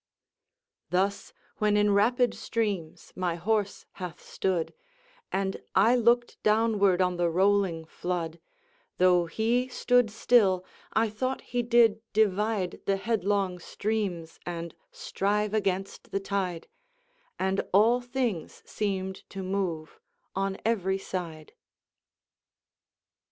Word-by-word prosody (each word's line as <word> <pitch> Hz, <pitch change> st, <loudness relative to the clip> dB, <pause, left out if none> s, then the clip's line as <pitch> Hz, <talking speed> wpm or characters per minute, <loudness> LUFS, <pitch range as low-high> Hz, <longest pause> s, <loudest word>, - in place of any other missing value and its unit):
Thus, 195 Hz, +3 st, 0 dB, 0.3 s
when 210 Hz, -1 st, +2 dB
in 205 Hz, 0 st, +3 dB
rapid 240 Hz, +5 st, +3 dB
streams 205 Hz, -8 st, -3 dB
my 180 Hz, -2 st, -1 dB
horse 205 Hz, +3 st, -1 dB, 0.2 s
hath 180 Hz, -1 st, -5 dB
stood, 180 Hz, -4 st, -2 dB, 0.6 s
And 190 Hz, 0 st, -1 dB
I 220 Hz, +6 st, +5 dB
look'd 240 Hz, 0 st, +2 dB
downward 210 Hz, -4 st, +3 dB
on 180 Hz, -1 st, 0 dB
the 175 Hz, -1 st, +2 dB
rolling 185 Hz, -2 st, +2 dB
flood; 170 Hz, 0 st, -4 dB, 0.6 s
Though 180 Hz, -1 st, +4 dB
he 235 Hz, +7 st, +1 dB
stood 245 Hz, -2 st, +2 dB
still, 205 Hz, -4 st, +3 dB, 0.3 s
I 225 Hz, +1 st, +2 dB
thought 255 Hz, +5 st, -3 dB
he 245 Hz, -, +2 dB
did 230 Hz, -2 st, +4 dB
divide 210 Hz, -2 st, +1 dB
The 195 Hz, 0 st, +2 dB
headlong 200 Hz, -3 st, 0 dB
streams, 190 Hz, -4 st, -3 dB
and 170 Hz, -1 st, -5 dB, 0.2 s
strive 210 Hz, +1 st, -1 dB
against 195 Hz, -2 st, -2 dB
the 195 Hz, -, -1 dB
tide, 190 Hz, -4 st, -3 dB, 0.7 s
And 190 Hz, +1 st, 0 dB
all 225 Hz, +6 st, +5 dB
things 245 Hz, -, -3 dB
seem'd 190 Hz, -2 st, -2 dB
to 195 Hz, -1 st, -6 dB
move 185 Hz, -, -3 dB, 0.4 s
on 195 Hz, 0 st, -1 dB
every 195 Hz, -4 st, +1 dB
side." 170 Hz, -5 st, -6 dB
195 Hz, 110 wpm, -28 LUFS, 180-220 Hz, 0.7 s, I